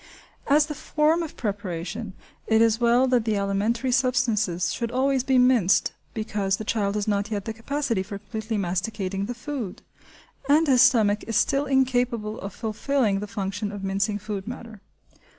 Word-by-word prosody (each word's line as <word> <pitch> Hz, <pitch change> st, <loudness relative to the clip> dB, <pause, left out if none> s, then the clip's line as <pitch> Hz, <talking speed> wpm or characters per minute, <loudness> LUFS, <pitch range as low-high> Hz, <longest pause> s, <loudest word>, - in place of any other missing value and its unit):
As 295 Hz, +1 st, +5 dB
for -, -, -16 dB
the -, -, -12 dB
form 310 Hz, +2 st, +2 dB
of 325 Hz, -, -6 dB
preparation, 205 Hz, 0 st, -4 dB, 0.3 s
it 220 Hz, 0 st, +4 dB
is 225 Hz, 0 st, +3 dB
well 240 Hz, +2 st, +4 dB
that 250 Hz, -3 st, +3 dB
the 220 Hz, -1 st, 0 dB
alimentary 210 Hz, +6 st, 0 dB
substances 235 Hz, -9 st, +1 dB
should 235 Hz, -, -3 dB
always 260 Hz, +1 st, +1 dB
be 265 Hz, -1 st, +2 dB
minced, 250 Hz, -7 st, +4 dB, 0.2 s
because 205 Hz, -3 st, -1 dB
the -, -, -5 dB
child 205 Hz, -2 st, -1 dB
has 210 Hz, 0 st, -1 dB
not 205 Hz, 0 st, 0 dB
yet 205 Hz, -3 st, -3 dB
the 225 Hz, -, -3 dB
capacity 230 Hz, -1 st, -2 dB
for 195 Hz, +1 st, -6 dB
completely 220 Hz, +2 st, -4 dB
masticating 195 Hz, +1 st, -2 dB
the 245 Hz, -, -4 dB
food, 245 Hz, -7 st, -6 dB, 0.7 s
and 305 Hz, +3 st, +5 dB
his 260 Hz, -4 st, +5 dB
stomach 215 Hz, -6 st, +4 dB
is 225 Hz, -, -3 dB
still 275 Hz, +6 st, +2 dB
incapable 245 Hz, -5 st, +1 dB
of 195 Hz, -, -5 dB
fulfilling 220 Hz, 0 st, 0 dB
the 210 Hz, -, -5 dB
function 205 Hz, 0 st, -3 dB
of 205 Hz, -1 st, -7 dB
mincing 195 Hz, +2 st, 0 dB
food 205 Hz, -1 st, -6 dB
matter. 230 Hz, -4 st, -8 dB
220 Hz, 170 wpm, -25 LUFS, 200-250 Hz, 0.7 s, As